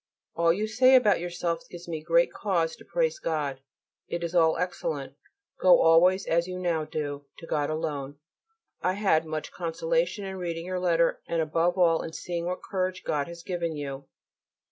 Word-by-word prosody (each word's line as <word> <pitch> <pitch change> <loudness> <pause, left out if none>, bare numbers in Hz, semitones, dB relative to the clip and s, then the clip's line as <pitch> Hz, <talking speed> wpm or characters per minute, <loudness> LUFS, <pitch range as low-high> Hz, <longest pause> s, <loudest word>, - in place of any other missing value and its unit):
All 170 0 +4
you 205 +5 0
say 255 +4 +5
about 220 -6 +5
yourself 175 -1 -2
gives 175 0 -10
me 160 -2 -4
great 170 +2 +3
cause 170 -6 0
to - - -14
praise - - 0
God. 145 -5 -2 0.5
It 170 0 -4
is 170 0 -3
all 165 -2 +4
excellent. 160 -6 -3 0.5
Go 185 -1 +7
always, 180 +4 +5
as 170 +1 +1
you 180 0 -5
now 170 -4 -1
do, 145 -2 -5
to - - -10
God 150 -3 -1
alone. 145 -3 -3 0.6
I 185 - +1
had 190 -6 +2
much 155 -1 -4
consolation 220 - -1
in 190 0 -5
reading 170 -2 -4
your 185 0 -2
letter 170 -2 +2
and 170 - -1
above 165 +3 +1
all 170 -3 +4
in 160 - -7
seeing 170 0 -4
what 180 +1 -4
courage 185 -1 -2
God 145 -2 -1
has 170 0 -10
given 170 -3 -3
you. 140 -2 -6
170 Hz, 180 wpm, -27 LUFS, 160-185 Hz, 0.6 s, Go